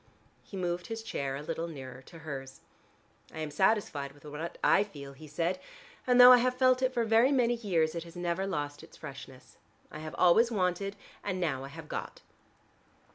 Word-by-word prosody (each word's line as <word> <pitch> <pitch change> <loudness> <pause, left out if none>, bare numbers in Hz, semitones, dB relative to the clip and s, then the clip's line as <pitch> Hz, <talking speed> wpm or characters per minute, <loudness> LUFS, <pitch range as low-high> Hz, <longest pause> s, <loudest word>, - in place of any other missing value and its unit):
He 195 - -10
moved 175 -1 -2
his 225 0 -5
chair 140 -11 -3
a 145 - -6
little 165 +2 -3
nearer 130 -5 -9
to 165 - -12
hers. 135 -3 -7 0.7
"I - - -11
am 155 -1 -4
satisfied 150 -6 +1
with 145 +1 -19
what 150 +3 -6
I - - +5
feel," 140 -9 -10
he 155 +3 -12
said. 170 +5 -1 0.5
"And 250 0 +4
though 250 0 +11
I 250 - +9
have 250 +1 +1
felt 255 -1 +4
it 260 0 +2
for 235 -2 0
very 225 +4 +4
many 245 -3 +3
years, 180 -9 0
it 170 -1 -4
has 170 0 -13
never 175 +2 -1
lost 145 -5 -3
its - - -15
freshness. 135 -3 -11 0.3
I 155 - -7
have 155 0 -7
always 200 +7 +5
wanted, 195 -1 -1 0.3
and 190 -2 -2
now 140 -7 -1
I - - -6
have 155 +2 -10
got." - - -6
170 Hz, 195 wpm, -30 LUFS, 145-220 Hz, 0.7 s, though